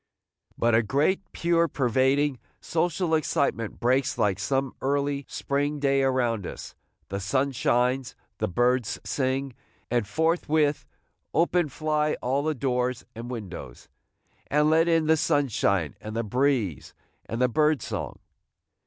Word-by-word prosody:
But 120 0 +2
a 115 - +5
great, 140 - +1
pure, 170 0 +2
pervading, 135 +1 +1 0.2
social 170 0 -1
excitement 140 -7 0
breaks 130 +3 +1
like 100 -2 +1
some 135 +5 -1
early 140 0 0
spring 145 +2 -1
day 140 -1 +2
around 120 -6 +1
us; - - -8 0.4
the 100 - -3
sun 130 +8 0
shines, 125 +1 +1 0.2
the - - 0
birds 120 +3 +1
sing; 135 0 -1 0.4
and 120 -4 +1
forthwith 160 -2 +1 0.5
open 170 -1 +2
fly 150 +1 0
all 130 +3 0
the 155 +1 -1
doors 125 -2 -1
and 115 +2 -7
windows, 95 - -8 0.6
and 150 +1 +3
let 165 +1 +4
in 165 -2 +3
the 160 +1 +4
sunshine 115 - +1
and 110 +1 -7
the 115 - 0
breeze 120 - 0 0.3
and 115 - -4
the 125 - +4
bird 150 +3 +2
song! - - -4
135 Hz, 135 wpm, -26 LUFS, 120-150 Hz, 0.6 s, a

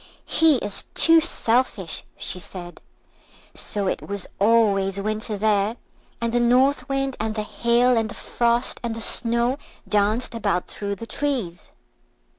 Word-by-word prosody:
"He 320 -2 +4
is 205 -5 -1
too 330 0 +6
selfish," 235 - +1
she 180 - -1
said. 175 -1 -9 0.7
So 205 -1 -3
it 185 - -1
was 200 -2 -4
always 200 -3 +3
Winter 215 +1 -3
there, 210 +2 +1 0.4
and 235 0 -2
the 240 - +3
North 255 +2 +2
Wind, 270 -1 -1
and 220 0 -2
the 215 - -2
Hail, 240 +3 +2
and 225 -1 0
the - - -8
Frost, 235 0 0
and 235 -2 -3
the 225 - -7
Snow 235 +4 +1 0.3
danced 215 +4 +1
about 205 -5 -1
through 200 -1 -4
the 230 - -8
trees. 235 -11 -3
225 Hz, 145 wpm, -23 LUFS, 205-245 Hz, 0.7 s, too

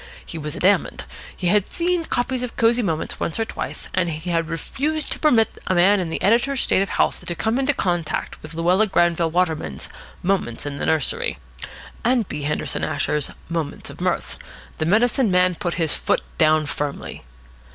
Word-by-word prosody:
He 165 - -6
was 150 -1 -5
adamant. 195 +2 +1 0.3
He 185 - -5
had 205 +1 +3
seen 345 -1 0
copies 250 -1 -1
of 250 -2 -4
Cosy 235 +1 +4
Moments 165 -7 -2
once 170 - -2
or 225 - +1
twice, - - -6
and 180 -2 +1
he 165 +2 -3
refused 265 - -2
to - - 0
permit 235 -8 +3
a 185 - +2
man 190 +4 +5
in 175 -3 -2
the 160 - -2
editor's 240 +6 +3
state - - +2
of 195 - -1
health - - 0
to 175 - -3
come 225 +7 0
in 270 - 0
contact 175 - -1
with 155 +1 -10
Luella 180 +6 +3
Granville 170 -3 +2
Waterman's 160 - -1 0.3
"Moments 180 -12 -1
in 140 -1 -4
the - - -2
Nursery" 155 - +1 0.7
and 240 -3 +2
B. 150 - -5
Henderson 150 +1 -2
Asher's 150 -1 0 0.2
"Moments 165 -4 -4
of - - -12
Mirth." - - -1 0.4
The 155 - 0
medicine 225 +4 +3
man 180 0 +4
put 175 -1 -3
his 165 -4 +2
foot - - +1 0.2
down 155 -1 +4
firmly. 145 -1 -4
180 Hz, 180 wpm, -22 LUFS, 160-225 Hz, 0.7 s, man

